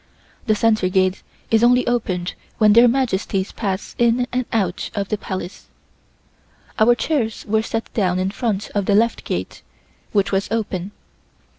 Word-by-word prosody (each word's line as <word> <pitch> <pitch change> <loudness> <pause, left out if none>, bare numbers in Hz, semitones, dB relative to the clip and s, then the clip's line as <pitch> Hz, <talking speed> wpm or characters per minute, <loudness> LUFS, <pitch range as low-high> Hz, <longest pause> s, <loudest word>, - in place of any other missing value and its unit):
The 215 - +3
center 215 -3 +2
gate 185 0 +1 0.3
is 225 0 +4
only 250 +1 +4
opened 185 -7 -1 0.2
when 210 -2 +5
their 235 +2 +7
Majesties 220 -6 0
pass 195 -3 -4
in 240 +1 +3
and 250 -1 -1
out 195 -5 -1
of 200 -1 -2
the 215 - +1
Palace. 185 -2 -6 1.1
Our 235 +3 +5
chairs 240 -5 -2
were 220 +1 +2
set 225 0 -4
down 185 -4 +1
in 185 +1 -1
front 210 -1 -2
of 200 -2 -1
the 200 - +3
left 230 +2 +2
gate, - - -4 0.5
which 200 -2 +1
was 195 0 0
open. 200 -4 -2
215 Hz, 155 wpm, -21 LUFS, 190-230 Hz, 1.1 s, their